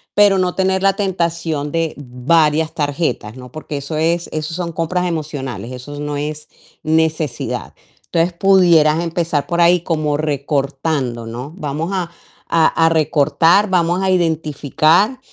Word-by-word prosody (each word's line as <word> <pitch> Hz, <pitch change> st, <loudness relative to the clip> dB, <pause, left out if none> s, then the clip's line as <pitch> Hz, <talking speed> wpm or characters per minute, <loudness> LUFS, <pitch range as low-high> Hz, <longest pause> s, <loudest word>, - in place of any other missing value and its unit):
Pero 205 Hz, -2 st, +5 dB
no 180 Hz, -1 st, 0 dB
tener 190 Hz, 0 st, +1 dB
la 195 Hz, 0 st, +3 dB
tentación 170 Hz, -6 st, -2 dB
de 165 Hz, -1 st, 0 dB
varias 150 Hz, +4 st, +1 dB
tarjetas, 145 Hz, -7 st, -2 dB
¿no? 125 Hz, -1 st, -11 dB
Porque 155 Hz, -1 st, -6 dB
eso 140 Hz, +3 st, -5 dB
es 170 Hz, +2 st, 0 dB
eso 155 Hz, +1 st, -4 dB
son 170 Hz, -1 st, -3 dB
compras 170 Hz, +3 st, -1 dB
emocionales, 135 Hz, -, -4 dB
eso 145 Hz, +4 st, -8 dB
no 145 Hz, 0 st, -3 dB
es 150 Hz, +1 st, -5 dB, 0.4 s
necesidad. 155 Hz, -4 st, -1 dB, 0.3 s
Entonces 170 Hz, +1 st, 0 dB
pudieras 170 Hz, -4 st, +4 dB
empezar 165 Hz, -3 st, -1 dB
por 175 Hz, -1 st, -1 dB
ahí 170 Hz, 0 st, +5 dB
como 155 Hz, -3 st, -1 dB
recortando, 140 Hz, -4 st, -2 dB
¿no? 125 Hz, +7 st, -7 dB
Vamos 155 Hz, +2 st, -3 dB
a 180 Hz, -3 st, -2 dB, 0.4 s
a 165 Hz, -1 st, +3 dB, 0.2 s
a 165 Hz, -, +5 dB
recortar, 165 Hz, +5 st, +3 dB
vamos 175 Hz, 0 st, +1 dB
a 190 Hz, -, +1 dB
identificar, 165 Hz, -, +1 dB
160 Hz, 140 wpm, -18 LUFS, 145-170 Hz, 0.4 s, Pero